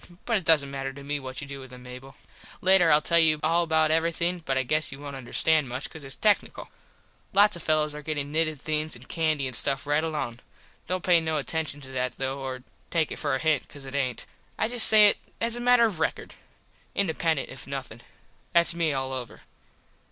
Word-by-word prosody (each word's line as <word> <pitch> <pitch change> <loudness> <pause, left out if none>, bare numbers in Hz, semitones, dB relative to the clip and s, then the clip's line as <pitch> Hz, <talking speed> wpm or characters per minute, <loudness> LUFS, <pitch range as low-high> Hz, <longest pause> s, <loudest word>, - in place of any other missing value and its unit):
But 230 -2 +2
it 190 - -5
doesnt 150 -4 +4
matter 135 -1 -4
to 140 +1 -11
me 145 +1 -2
what 130 -1 -7
you 145 - -8
do 140 0 -7
with 130 -1 -11
them, 125 0 -12
Mable. 125 +2 -11 0.4
Later 185 -2 +5
Ill 150 0 +5
tell 170 -1 +3
you 155 -2 +4
all 165 +2 +3
about 160 -1 +2
everything 170 +2 0
but 135 -3 -1
I 130 - +2
guess 155 +5 0
you 135 - -8
wont 140 -1 -8
understand 135 +3 +1
much 130 +3 -4
cause 160 - -10
its 135 -1 -8
tecknickle. 210 -1 0 0.6
Lots 205 +1 +5
of 170 - -7
the - - -11
fellos 155 -1 +2
are 150 - -7
gettin 145 -1 -4
nitted 155 -2 +1
things 155 0 -1
and 120 +2 -14
candy 155 -4 0
and 130 -2 -3
stuff 135 +2 +2
right 145 +2 +1
along. 135 -7 -3 0.5
Dont 185 0 -2
pay 175 -2 +4
no 160 -1 -1
attenshun 145 -1 -3
to 130 - -11
that, 130 -1 -2
though, 135 +1 -2
or 130 -1 -5 0.3
take 160 -3 0
it - - -5
for 145 -3 0
a - - -2
hint 155 -2 0
cause 140 -2 -10
it 135 - -9
aint. 130 -3 -2 0.3
I - - +1
just 240 -2 +4
say 215 -1 +7
it - - +3 0.2
as 230 +1 0
a 240 - -4
matter 245 -1 +5
of 200 -8 -2
rekord. 160 - -2 0.6
Independent 165 -5 0
if 135 -1 -10
nothin. 135 -4 -6 0.5
Thats 170 0 +4
me 165 -3 0
all 130 -1 -3
over. 125 -3 -7
150 Hz, 225 wpm, -26 LUFS, 135-165 Hz, 0.6 s, say